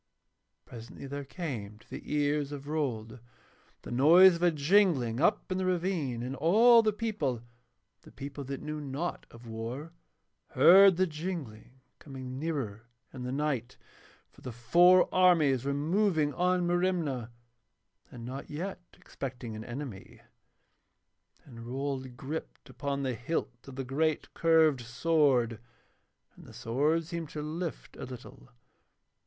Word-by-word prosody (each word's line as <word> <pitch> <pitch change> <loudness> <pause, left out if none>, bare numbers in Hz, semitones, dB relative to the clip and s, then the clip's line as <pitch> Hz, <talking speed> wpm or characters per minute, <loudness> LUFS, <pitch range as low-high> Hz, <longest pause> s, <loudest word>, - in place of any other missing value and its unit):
Presently 115 +3 -10
there 140 +1 -5
came 130 - -6
to 110 - -22
the - - -8
ears 145 -1 0
of 140 -1 -8
Rold 125 -7 -3 0.6
the - - -8
noise 170 +9 +7
of - - -12
a 175 - +5
jingling 150 - +2
up 195 +4 +1
in 185 - -1
the 185 - -1
ravine, 170 -10 -1
and 130 +2 -4
all 225 - +6
the 215 -1 +1
people, 180 - -3 0.6
the - - -16
people 140 +1 -7
that 140 +1 -6
knew 150 0 -5
naught 145 +5 -4
of 120 +1 -15
war, 120 +8 -6 0.6
heard 190 0 +7
the 185 - +3
jingling 150 - -7 0.2
coming 130 -2 -8
nearer 125 -9 -4 0.3
in 130 - -8
the 125 0 -4
night; 135 -4 -2 0.5
for - - -20
the 125 - -6
four 175 +11 +5
armies 160 -9 +4
were 140 - 0
moving 155 +1 +1
on 180 0 +1
Merimna 175 -9 -1 0.8
and 115 -1 -10
not 130 +3 -7
yet 180 +5 -5 0.2
expecting 125 -4 -7
an 110 - -7
enemy. 120 -4 -8 1.3
And 115 -4 -11
Rold 130 -1 -4
gripped 150 +5 -7
upon 140 -1 -3
the 130 -2 -1
hilt 125 0 -4
of 135 - -10
the 135 - -4
great 150 +4 -1
curved 160 -5 +3
sword, 125 -2 +1 0.8
and - - -15
the - - -13
sword 150 +8 0
seemed 165 -2 -5
to 150 -1 -6
lift 165 +2 -5
a - - -6
little. 125 - -11
145 Hz, 140 wpm, -30 LUFS, 125-170 Hz, 1.3 s, noise